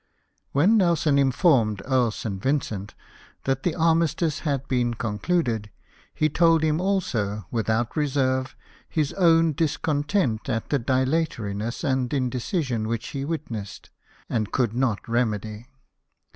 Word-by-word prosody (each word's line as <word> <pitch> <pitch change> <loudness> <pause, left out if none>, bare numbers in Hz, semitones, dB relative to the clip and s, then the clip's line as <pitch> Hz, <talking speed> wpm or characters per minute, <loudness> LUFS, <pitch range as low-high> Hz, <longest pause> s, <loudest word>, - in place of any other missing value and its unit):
When 185 +11 +4
Nelson 165 -6 +3
informed 130 - +3
Earl 130 -3 +2
St. 100 -3 -5
Vincent 110 -7 -2 0.5
that 135 0 0
the 170 0 -1
armistice 165 -1 +1
had 140 -3 -2
been 120 -2 0
concluded, 115 0 -1 0.4
he 155 - +1
told 165 +1 +3
him 155 +1 +1
also, 115 - -1
with 115 -1 -1
out 110 +1 0
reserve, 130 -3 0 0.3
his 150 -3 -1
own 165 -3 +4
discontent 145 - 0
at 115 -3 -2
the 145 - +2
dilatoriness 130 -4 -1
and 130 -4 0
indecision 130 - -1
which 115 +1 -3
he 135 -1 -4
witnessed, 130 -10 -5 0.4
and 110 -3 -2
could 120 -4 +1
not 120 -4 -1
remedy. 110 -1 -2
130 Hz, 125 wpm, -25 LUFS, 115-155 Hz, 0.5 s, When